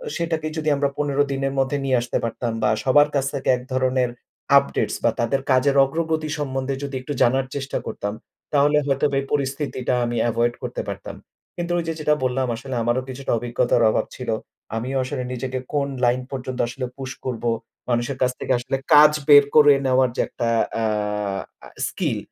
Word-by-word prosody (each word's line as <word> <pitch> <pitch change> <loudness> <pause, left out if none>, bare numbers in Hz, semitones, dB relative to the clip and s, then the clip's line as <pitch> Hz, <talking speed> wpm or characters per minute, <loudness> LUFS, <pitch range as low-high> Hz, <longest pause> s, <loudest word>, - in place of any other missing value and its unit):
সেটাকে 160 -2 -2
যদি 155 -1 0
আমরা 140 0 +1
১৫ 145 -1 -1
দিনের 135 0 -1
মধ্যে 135 +2 +1
নিয়ে 130 -2 +2
আসতে 120 - -2
পারতাম 115 +1 -2
বা 105 - +4
সবার 145 +3 +5
কাছ 135 -1 +1
থেকে 135 -2 -2
এক 125 - -10
ধরনের 130 -1 +1 0.5
আপডেটস 140 - +1
বা - - +5
তাদের 125 +4 +1
কাজের 130 +2 +3
অগ্রগতি 160 +2 -1
সম্বন্ধে 135 -1 -2
যদি 140 -1 -4
একটু 145 +3 -5
জানার 130 +2 +3
চেষ্টা 135 -1 -3
করতাম, 100 +1 -4 0.4
তাহলে 145 +1 +4
হয়তোবা 140 +1 +1
এই - - -7
পরিস্থিতিটা 135 -2 -1
আমি 120 0 -2
এভয়েড 120 +1 +1
করতে - - -3
পারতাম। - - -6 0.4
কিন্তু 175 0 -3
ওই 170 - 0
যে 165 - -1
যেটা 150 0 +2
বললাম, 130 +1 0
আসলে 130 +3 -6
আমারও 120 +2 +1
কিছুটা 130 +1 -4
অভিজ্ঞতার 120 0 +1
অভাব - - +1
ছিল। 125 - -6 0.5
আমিও 130 +4 -2
আসলে 130 0 -4
নিজেকে 130 +1 -3
কোন 140 -1 +1 0.2
লাইন 125 +1 +2
পর্যন্ত 130 -1 -5
আসলে 125 +2 -4
পুশ 135 -1 -5
করব। 125 -3 -4 0.5
মানুষের 120 +2 0
কাছ 125 -1 +3
থেকে - - 0
আসলে 135 +2 -2 0.2
কাজ 150 0 +9 0.2
বের 145 -1 +9
করে 145 -1 +8
নেওয়ার 130 -1 +3
যে - - +1
একটা 120 - -3 0.3
অ্যা 115 - -1 0.8
আ - - -11 0.2
স্কিল - - -2
135 Hz, 180 wpm, -22 LUFS, 125-145 Hz, 0.8 s, কাজ